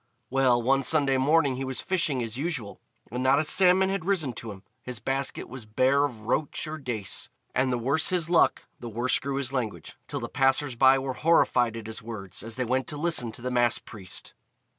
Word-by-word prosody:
Well, 130 -2 +3
one 135 +3 +2
Sunday 140 -2 +3
morning 140 -1 +3
he 135 - -3
was 130 -1 -4
fishing 155 -9 0
as 115 0 -5
usual, 135 -7 -4 0.3
and 125 +1 -3
not 130 +2 +4
a 155 - +2
salmon 185 +3 +4
had 195 -3 -2
risen 165 -9 0
to 115 -1 -7
him, 95 -1 -12 0.2
his 125 -3 -7
basket 135 +2 -3
was 125 -3 -9
bare 130 +6 +3
of 120 -7 -6
roach 140 +7 -1
or 155 0 -6
dace. 120 -8 -3 0.2
And 130 0 +1
the 125 - +1
worse 140 +6 +1
his 175 -3 +1
luck, 170 -1 +3
the 120 - -7
worse 120 +3 +1
grew 135 +2 -3
his 135 -1 -2
language, 120 -5 -4
till - - -4
the - - -4
passers 135 +1 +1
by 130 +2 +6
were 135 -1 -3
horrified 125 -6 +2
at 115 - -8
his 110 0 -6
words 105 -5 -7
as 115 0 -6
they 130 0 -1
went 130 +2 0
to 150 -3 -4
listen 150 -7 +1
to 120 - -6
the 125 - -2
Mass 120 -1 +2
priest. 95 -5 -6
130 Hz, 215 wpm, -27 LUFS, 120-145 Hz, 0.3 s, by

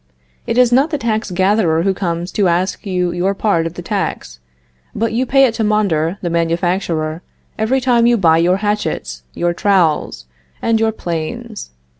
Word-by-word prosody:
It - - -1
is 250 -1 +4
not 270 +5 +3
the 305 - -1
tax 220 -4 -2
gatherer 185 -3 +2
who 195 0 +1
comes 175 -1 -3
to 200 -3 +1
ask 180 +4 -1
you 180 -2 0
your 180 +3 -1
part 170 -6 +1
of 165 - -9
the - - -7
tax, 60 0 -4 0.6
but 225 0 -1
you 250 +3 0
pay 270 +1 +5
it 240 - 0
to 225 - -2
Mondor, 195 -5 +1
the 175 - -1
manufacturer, 170 -1 -1 0.4
every 235 +5 +1
time 240 -2 +3
you 240 0 +3
buy 165 -5 +4
your 180 +2 +3
hatchets, 210 +1 -3
your 175 0 0
trowels, 170 - +1 0.3
and 230 -1 +1
your 225 0 +2
planes. 210 +5 -5
195 Hz, 175 wpm, -17 LUFS, 170-225 Hz, 0.6 s, pay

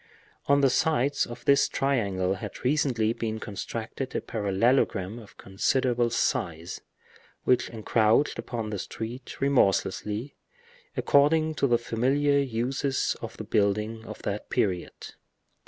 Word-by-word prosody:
On 140 0 +4
the 135 - +5
sides 145 -1 +1
of 120 0 -10
this 140 0 +4
triangle 100 -9 0
had 95 - -7
recently 125 -5 +2
been 110 -1 -3
constructed 115 +5 -5
a - - 0
parallelogram 105 0 +1
of 110 - -15
considerable 120 +5 +1
size, 85 -6 -1 0.6
which 125 -1 +2
encroached 110 +3 +2
upon 115 -3 -4
the 100 - -3
street 120 +6 -7
remorselessly, 110 -2 +1 0.6
according 155 +2 +3
to 140 - +1
the 120 -2 +4
familiar 135 +5 +1
uses 135 +2 -1
of - - -7
the - - -5
building 105 +2 0
of 110 - -8
that 100 +1 -4
period. 90 -4 -2
115 Hz, 120 wpm, -27 LUFS, 105-135 Hz, 0.6 s, the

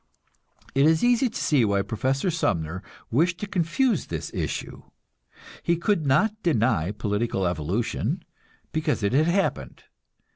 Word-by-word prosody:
It 140 +2 +4
is 160 0 +3
easy 245 +1 +3
to - - -6
see 145 -5 +3
why 100 -2 +2
Professor 130 - -1
Sumner 85 - -1 0.3
wished 170 +8 +2
to - - -3
confuse 195 +7 0
this - - -5
issue. - - -4 0.8
He 170 0 +1
could 170 -3 0
not 210 +11 +2
deny 115 - +1
political 105 -1 -1
evolution, 100 - -1 0.5
because 155 -7 -1
it 100 - +1
had 155 +4 +4
happened. 170 - -1
140 Hz, 135 wpm, -25 LUFS, 105-170 Hz, 0.8 s, It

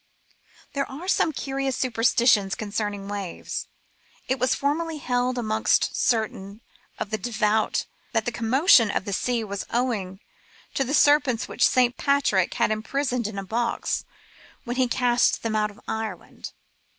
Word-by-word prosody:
There 275 -1 -2
are 300 +7 -8
some 325 - +2
curious 270 -2 -2
superstitions 230 -4 +3
concerning 205 -2 -3
waves. 200 -3 -5 0.6
It 260 +1 0
was 255 0 +2
formerly 315 +3 -1
held 250 -2 -1
amongst 220 -2 +1
certain 220 -3 -1 0.4
of 205 - -5
the 220 - -1
devout 220 -1 0 0.3
that 225 -3 0
the 240 - -1
commotion 235 - +4
of 205 - -1
the 200 - -3
sea 240 +3 0
was 200 -2 -4
owing 215 -7 -1 0.5
to 270 - +1
the 275 +3 -1
serpents 290 -6 +4
which - - +3
St. 250 -1 +2
Patrick 280 -10 +2
had - - +2
imprisoned 245 +2 -1
in 215 -2 -7
a 195 - -3
box 235 +4 -1 0.6
when 240 +1 -4
he 255 -1 +3
cast 245 0 +2
them 225 -1 -1
out 210 0 +1
of 205 +2 -16
Ireland. 220 -5 -5
235 Hz, 150 wpm, -25 LUFS, 215-255 Hz, 0.6 s, commotion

